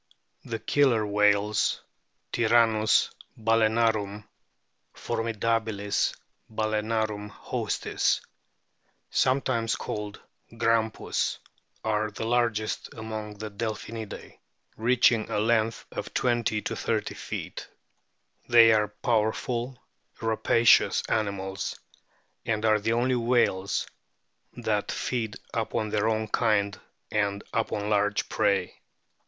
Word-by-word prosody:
The 115 - -4
Killer 115 -1 +2
whales 105 0 +2 0.3
(" - - -48
Tyrannus 115 -2 +3 0.3
balaenarum," 110 -2 +1 0.3
" - - -48
For - - -2
midabilis 110 -2 0 0.4
balsenarum 110 -1 -1
hostis - - -1 0.5
"), - - -47 0.3
sometimes 130 -3 +1
called 105 -1 -5 0.4
"Grampus,"t 115 -1 0 0.5
are 110 0 +1
the 110 - -5
largest 115 -2 0
among 110 -1 -6
the 105 +1 -7
Delphinidae, 110 +1 -6 0.4
reaching 120 -1 +3
a - - -1
length 110 +1 +1
of - - -6
20 120 -3 +1
30 - - -2
feet. - - -6 0.8
They 115 -1 +8
are 105 -1 +3
power 110 +1 +1
ful, 125 +2 -4 0.4
rapacious 115 0 +4
animals, 100 -2 -2 0.6
and 110 -1 -1
are 110 -1 +4
the 115 +2 0
only 125 +2 +2
whales 115 -5 +1 0.7
that 110 -4 -1
feed 115 -4 -2 0.2
upon 110 -1 -1
their 110 +1 +1
own 110 0 0
kind 105 -3 +1 0.3
and 100 -1 0
upon 105 -2 -1
large 105 0 +1
prey. 95 -3 0
110 Hz, 100 wpm, -27 LUFS, 105-115 Hz, 0.8 s, They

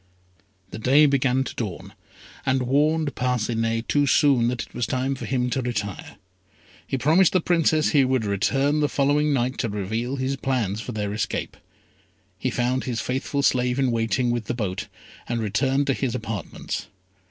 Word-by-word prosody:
The 110 - -6
day 135 +6 +5
began 135 -2 +2
to - - -6
dawn, 105 -7 -5 0.5
and 130 0 +1
warned 150 +3 +1
Parcinet, 115 -2 -1
too 145 -1 +2
soon, 130 -4 +4
that 120 0 -1
it - - -16
was 120 - -2
time 130 +3 -1
for 135 - -6
him 125 -2 -1
to 130 - 0
retire. 105 -5 -4 0.7
He 135 - -1
promised 160 +7 +4
the 185 - +4
Princess 165 -2 +2
he 140 -3 +5
would 130 -3 +1
return 135 +9 +1
the 150 -1 +2
following 145 +2 +2
night 130 -1 0
to 115 - 0
reveal 110 +6 -2
his 135 +1 -2
plans 115 -7 -1
for 125 - -6
their 105 -2 -3
escape. 105 - -3 0.8
He - - -1
found 125 +1 -1
his 120 -3 -2
faithful 135 +3 -2
slave 125 -1 +2
in 135 -2 +2
waiting 115 +2 0
with 120 -2 -2
the 120 - -3
boat, 100 -6 -3 0.4
and 120 -1 -1
returned 130 +6 +1
to 135 - +1
his 130 -2 -2
apartments. 110 -4 -5
125 Hz, 175 wpm, -24 LUFS, 115-140 Hz, 0.8 s, day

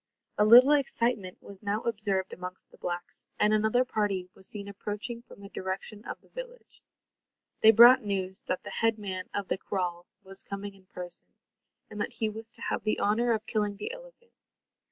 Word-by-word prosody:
A 210 - +6
little 245 +6 +9
excitement 235 -9 +1
was 200 -1 -9
now 210 +1 -1
observed 205 -4 -1
amongst 180 +1 -7
the - - -16
blacks, 175 0 -4
and 210 0 +4
another 220 +4 +3
party 205 -6 -1
was 190 - -5
seen 200 -1 -3
approaching 210 +4 -4
from 235 - -15
the 200 - -10
direction 195 +3 -4
of - - -6
the - - -25
village. - - -10 0.8
They 220 - +7
brought 240 +4 +9
news 190 -3 -1
that 185 - -2
the - - -7
head 225 -1 +2
man 190 -3 -5
of 200 -2 -3
the - - -1
kraal 175 -3 -3 0.2
was 195 0 -4
coming 200 0 -6
in 190 -1 -21
person, 180 -1 -8 0.6
and 210 - -5
that 235 - -2
he 220 -2 -1
was 220 +1 -8
to - - -9
have - - -2
the 215 - 0
honour 235 +4 +2
of 220 -1 -2
killing 210 -3 -1
the 205 - -4
elephant. - - -13
210 Hz, 190 wpm, -29 LUFS, 190-225 Hz, 0.8 s, little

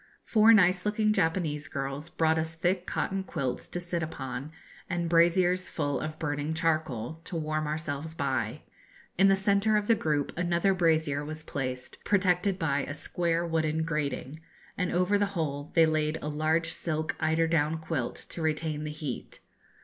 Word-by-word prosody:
Four 220 0 +6
nice 180 -4 +5
looking 215 0 +2
Japanese 160 -6 0
girls 140 +3 -4
brought 160 -2 +2
us 160 0 -2
thick 180 +2 0
cotton 195 0 -1
quilts 140 -9 -3
to 175 - -3
sit 175 -1 -2
upon, 135 -2 -5 0.4
and 175 -1 -1
braziers 175 +2 +3
full 145 -3 -1
of 155 0 -5
burning 145 0 -2
charcoal, 160 -4 -1
to 175 - -5
warm 155 -1 -1
ourselves 155 0 -4
by. 130 -7 -2 0.6
In 195 - +7
the 195 - +5
centre 200 +2 +3
of 210 - 0
the 230 - +5
group 150 -8 -1
another 175 +2 +2
brazier 160 -5 +2
was 155 +1 -6
placed, 130 -4 -4
protected 185 -1 +2
by 140 -6 +1
a 145 - -4
square 170 +2 0
wooden 160 -1 0
grating, 150 -2 -2 0.4
and 180 -2 -1
over 180 +3 +2
the 205 - +2
whole 145 -2 -2
they 165 -1 +7
laid 155 0 0
a 150 - -2
large 155 +2 +1
silk 155 -1 -2
eider 160 +1 +2
down 160 -1 +1
quilt, 160 -6 -3
to 170 - -4
retain 155 -1 -1
the - - -3
heat. 150 -4 -6
160 Hz, 165 wpm, -29 LUFS, 150-175 Hz, 0.6 s, In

